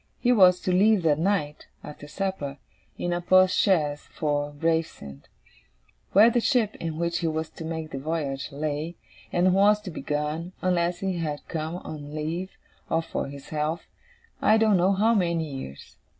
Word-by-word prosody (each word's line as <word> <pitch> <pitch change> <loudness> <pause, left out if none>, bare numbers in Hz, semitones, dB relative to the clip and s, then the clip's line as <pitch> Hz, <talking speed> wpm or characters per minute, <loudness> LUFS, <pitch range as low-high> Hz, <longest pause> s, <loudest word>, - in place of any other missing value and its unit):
He 245 - +2
was 185 -6 +6
to 185 - -1
leave 200 +1 +4
that 155 -2 +2
night, 165 -5 -1 0.2
after 145 0 -10
supper, 150 -6 -4 0.4
in 175 - -2
a 175 - -2
post 185 +1 +4
chaise, 150 -7 +2
for 145 -1 -1
Gravesend; 145 - -3 0.8
where 215 +5 +7
the 240 - +2
ship, 230 -5 +2
in 160 -2 -4
which 170 0 -1
he 170 - -1
was 160 0 -3
to - - -9
make 160 -1 -5
the 135 - -4
voyage, 140 -2 -3
lay; 150 +3 -3 0.4
and 180 +1 +3
was 205 +2 +5
to 195 -4 -7
be - - -7
gone 150 +4 -3
unless 175 -1 +1
he 190 -3 -2
came 150 -2 -3
home 160 +2 -4
on 150 -1 -8
leave, 165 +5 -3 0.4
or 165 0 +1
for - - -4
his 140 0 -10
health 155 +2 -2 0.6
I 215 - +5
don't 220 -3 +4
know 185 +3 +3
how 215 +4 +3
many 170 -6 +1
years. 135 - -9
165 Hz, 175 wpm, -26 LUFS, 150-185 Hz, 0.8 s, where